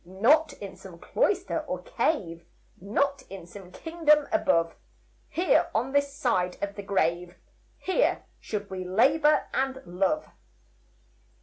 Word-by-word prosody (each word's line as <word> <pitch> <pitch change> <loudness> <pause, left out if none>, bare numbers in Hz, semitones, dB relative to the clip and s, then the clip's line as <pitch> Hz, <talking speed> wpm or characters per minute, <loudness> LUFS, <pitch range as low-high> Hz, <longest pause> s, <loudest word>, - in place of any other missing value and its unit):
Not 265 - +3
in 200 -7 -9
some 185 -2 -12
cloister 390 - 0
or - - -5
cave, 170 - -1 0.4
Not 275 +8 0
in 195 -3 -9
some 180 +1 -12
kingdom 300 - +2
above, 165 - +2 0.6
Here, 355 +2 +2
on 245 +5 0
this 285 0 +2
side 185 -10 0
of 200 0 -3
the 205 - -7
grave, 175 -3 -1 0.4
Here, 380 +7 0
should 205 -2 -5
we 185 -1 -4
labor 285 - +3
and 265 0 -1
love. 195 - 0
210 Hz, 125 wpm, -27 LUFS, 185-295 Hz, 0.6 s, Not